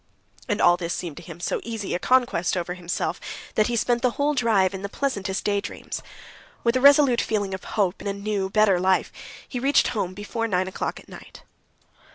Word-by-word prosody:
And 205 - 0
all 175 -4 +5
this 170 -1 -3
seemed 165 -5 -5
to - - -8
him 170 -2 -10
so - - -2
easy 225 -4 -4
a 175 - 0
conquest 240 -7 +2
over 175 0 -2
himself 175 -1 -3 0.3
that 215 - +3
he 240 - -1
spent 235 +1 +1
the 250 - +3
whole 290 +1 +2
drive 220 -8 +2
in 190 - -5
the 200 - -4
pleasantest 200 -7 -2
daydreams. 205 -1 -3 0.6
With 235 +1 +2
a 255 - +2
resolute 280 -3 +6
feeling 205 -3 -1
of 190 - -5
hope 195 -3 +1
in - - -5
a 200 - 0
new, 200 -1 -2
better 210 -3 +4
life, 185 0 +2 0.4
he 250 - -4
reached 275 +3 +3
home 185 -5 -2
before 230 +3 -3
nine 185 -3 0
o'clock 190 - -4
at - - -17
night. - - -13
205 Hz, 205 wpm, -24 LUFS, 185-235 Hz, 0.6 s, resolute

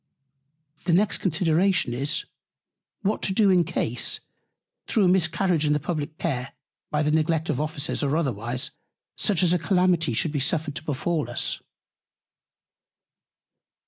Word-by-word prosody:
The 175 - +2
next 200 +4 +2
Consideration 175 -3 +2
is, 140 +5 -1 0.8
What 205 +2 0
to 190 - 0
do 200 -1 +4
in 180 -2 +5
Case, 125 -8 -1 0.7
through 215 - +2
a - - +5
Miscarriage 175 -2 +2
in 150 -1 +3
the 150 - +1
publick 155 0 -4
Care, 135 -6 -3 0.4
by 150 0 0
the 150 - +1
Neglect 160 +1 +1
of - - -1
Officers, 150 -2 -2
or 145 +2 +1
otherwise, 125 -4 -2 0.4
such 190 -3 +1
a 180 0 +3
Calamity 180 - +2
should 150 +7 0
be 145 - -1
suffered 150 +2 0
to - - -7
befall 150 -1 -1
us. 120 - -2
160 Hz, 140 wpm, -25 LUFS, 145-180 Hz, 0.8 s, in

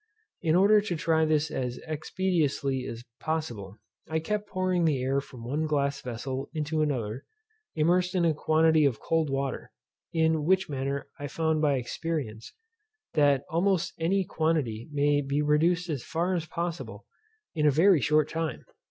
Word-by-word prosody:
In 160 -1 +2
order 205 +3 +6
to 190 -4 -3
try 160 0 +2
this 155 0 +1
as 125 -1 -3
expeditiously 155 -5 -1
as 115 +1 -7 0.2
possible, 120 -12 -4 0.3
I 160 - 0
kept 210 +6 -2
pouring 185 -2 0
the 150 -5 +2
air 135 +2 0
from 130 -4 -11
one 150 +6 -1
glass 140 -2 0
vessel 130 +2 -5
into 155 0 -1
another, 125 -5 -2 0.5
immersed 180 +4 +2
in 175 -2 +3
a 165 - +3
quantity 160 +1 +3
of 135 -6 +2
cold 165 -2 0
water, 135 -1 -3 0.4
in 160 -2 +2
which 190 +4 +2
manner 140 0 -3
I 145 - -4
found 160 +1 0
by 145 -2 +3
experience, 125 -3 -4 0.6
that 145 -3 +3
almost 180 +1 +1
any 190 +4 +1
quantity 155 - -1
may 145 0 +2
be 140 +1 -1
reduced 165 +4 +2
as 145 -7 -3
far 170 +3 -1
as 165 -3 -2
possible 170 +1 -5 0.5
in 150 -2 +2
a - - +7
very 165 +2 +5
short 150 +4 +3
time. 160 -5 -3
155 Hz, 160 wpm, -28 LUFS, 140-165 Hz, 0.6 s, a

